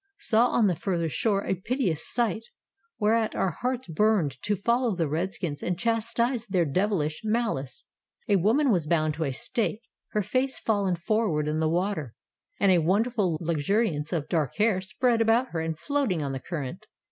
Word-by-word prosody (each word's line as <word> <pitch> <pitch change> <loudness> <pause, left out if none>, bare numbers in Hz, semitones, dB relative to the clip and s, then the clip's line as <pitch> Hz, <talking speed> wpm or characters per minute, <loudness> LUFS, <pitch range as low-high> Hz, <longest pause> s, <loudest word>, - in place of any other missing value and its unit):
Saw 230 - +4
on 240 -2 +2
the 185 -4 +2
further 170 -1 -1
shore 200 +4 0
a - - 0
piteous 190 - -1
sight, 230 -2 0 0.6
whereat 220 +1 +1
our 190 - +1
hearts 250 +8 -3
burned 165 -6 +1
to 210 - 0
follow 235 +2 +1
the 165 -3 0
redskins 160 -1 -3
and 180 -1 -2
chastise 235 +2 0
their 185 -4 +1
devilish 160 -1 0
malice. 215 - -2 0.4
A 200 - +4
woman 235 - +3
was 170 -7 +1
bound 155 -2 +1
to 160 +1 -2
a 135 - -1
stake, 215 - -2 0.3
her 210 - +1
face 255 +6 0
fallen 200 -4 0
forward 175 -5 0
in 155 +1 -1
the 160 0 +1
water, 170 - -1 0.4
and 200 -1 +4
a 180 - +5
wonderful 195 0 +1
luxuriance 165 0 0
of 160 -5 -2
dark 155 -6 -1
hair 210 -3 +2
spread 230 +5 +1
about 230 +3 +3
her 165 - -3
and 160 -1 -3
floating 255 - -1
on 140 - -2
the 135 - -4
current. 140 -2 -6
190 Hz, 175 wpm, -27 LUFS, 160-225 Hz, 0.6 s, a